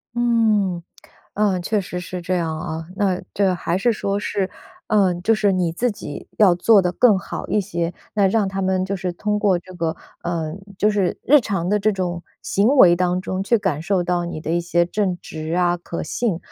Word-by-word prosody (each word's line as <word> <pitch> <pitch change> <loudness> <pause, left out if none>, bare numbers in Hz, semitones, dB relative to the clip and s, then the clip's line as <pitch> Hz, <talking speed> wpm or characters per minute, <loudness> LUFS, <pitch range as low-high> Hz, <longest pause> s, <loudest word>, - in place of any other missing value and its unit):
嗯。 220 -7 +2 0.5
嗯， 200 -3 +1
确 210 +4 0
实 180 -2 -5
是 180 0 -6
这 185 +2 -1
样 160 -3 -2
啊。 160 -1 -5
那 190 -3 +1
这 195 -2 +2
还 175 0 -1
是 230 +5 +2
说 200 -1 -2
是， 195 -2 -2 0.4
嗯， 190 -5 +2
就 225 +5 +3
是 205 -2 +2
你 180 -3 0
自 240 +9 0
己 175 -9 -8
要 200 -5 +6
做 200 +4 +5
得 180 -1 0
更 210 +2 +4
好 190 - -6
一 210 - +1
些， 175 -3 -3 0.2
那 200 -2 +3
让 210 +2 +2
他 195 0 -3
们 185 -1 +1
就 190 +1 -3
是 180 -1 -3
通 210 +3 -1
过 200 -4 +3
这 185 +2 -12
个， 165 -2 -2 0.3
嗯， 165 0 -3 0.2
就 210 - +3
是 200 -4 0
日 295 +2 +6
常 195 -7 -2
的 210 +1 +2
这 215 +2 +2
种 175 -2 -3 0.2
行 200 +2 +1
为 180 -10 +8
当 180 0 0
中 185 0 -3
去 230 +4 +2
感 190 -8 -1
受 180 +1 0
到 175 0 0
你 165 -2 -5
的 160 - -3
一 170 - +2
些 170 0 +1
正 185 0 -1
直 160 0 -6
啊、 175 -1 +2
可 170 0 -6
信， 225 -8 -1
185 Hz, 225 characters per minute, -21 LUFS, 175-205 Hz, 0.5 s, 为